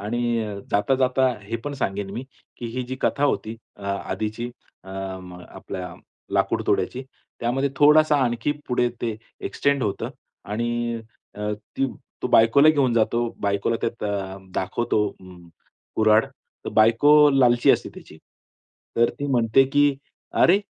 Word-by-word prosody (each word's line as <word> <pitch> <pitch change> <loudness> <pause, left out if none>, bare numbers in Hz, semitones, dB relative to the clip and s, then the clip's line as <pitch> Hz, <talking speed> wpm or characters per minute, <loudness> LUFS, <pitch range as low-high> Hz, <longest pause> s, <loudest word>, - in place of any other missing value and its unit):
आणि 110 +4 -2 0.5
जाता-जाता 130 +4 +2
हे 115 +3 -4
पण 145 - -3
सांगेल 100 -6 -3
मी, 125 - -5 0.3
की 120 - -6
ही 130 - -1
जी 130 - -4
कथा 145 - +1
होती 115 -5 -1 0.2
अ 100 - -15
आधीची 105 +4 -3 0.3
अम, 95 -1 -7 0.2
आपल्या 90 -1 -7 0.4
लाकूडतोड्याची, 130 - 0 0.4
त्यामध्ये 135 +4 0
थोडासा 150 +1 +6
आणखी 120 +4 0 0.2
पुढे 125 0 +2
ते 115 -3 -2 0.3
एक्सटेंड 140 -1 0
होतं 105 -3 -2 0.4
आणि 120 +1 -2 0.3
अ, 105 0 -3 0.2
ती 135 - +2 0.4
तो - - +1
बायकोला 115 +7 +6
घेऊन 140 -5 +3
जातो. 120 +1 +1
बायकोला 100 +3 0
त्यात 115 - -3
अ, 95 -2 -3 0.2
दाखवतो 105 +2 0
अम, 90 -2 -14 0.5
कुऱ्हाड. 110 0 +5 0.4
तर - - -3
बायको 115 +7 +5 0.2
लालची 125 -3 +4
असते - - +1
त्याची. - - -13 0.8
तर 120 0 +4
ती 145 - -2
म्हणते, 120 -1 +4
की 145 +1 +3 0.4
"अरे! 190 +4 +4
120 Hz, 135 wpm, -23 LUFS, 105-130 Hz, 0.8 s, थोडासा